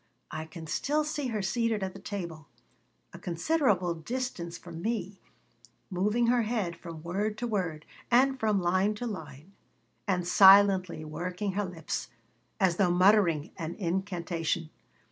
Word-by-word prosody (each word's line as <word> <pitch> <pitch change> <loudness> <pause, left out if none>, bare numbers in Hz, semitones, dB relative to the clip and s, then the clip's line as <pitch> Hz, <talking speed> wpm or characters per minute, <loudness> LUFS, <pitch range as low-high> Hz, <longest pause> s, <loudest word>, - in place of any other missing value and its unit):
I 155 0 -4
can 160 0 -9
still 295 - 0
see 300 -2 -3
her 215 -4 -2
seated 220 +1 0
at 190 -1 -3
the 195 - -10
table, 170 -7 -6 0.7
a 170 - -9
considerable 185 - +1
distance 170 -2 -4
from 170 -1 -9
me, 200 -3 -3 0.7
moving 210 +6 +1
her 240 +1 +3
head 215 -6 -1
from 165 -2 -9
word 205 +5 -2
to 245 - -3
word 180 -9 -2 0.2
and 265 +2 +4
from 215 -3 +2
line 185 +4 +2
to 245 - -5
line, 160 - -7 0.6
and 180 -3 0
silently 190 -3 +6
working 180 +5 -3
her 205 +2 -1
lips, 170 -4 -4 0.5
as 180 -3 +3
though 190 -3 +3
muttering 180 -4 +4
an 165 -2 -4
incantation. 170 -3 -2
190 Hz, 145 wpm, -29 LUFS, 170-215 Hz, 0.7 s, silently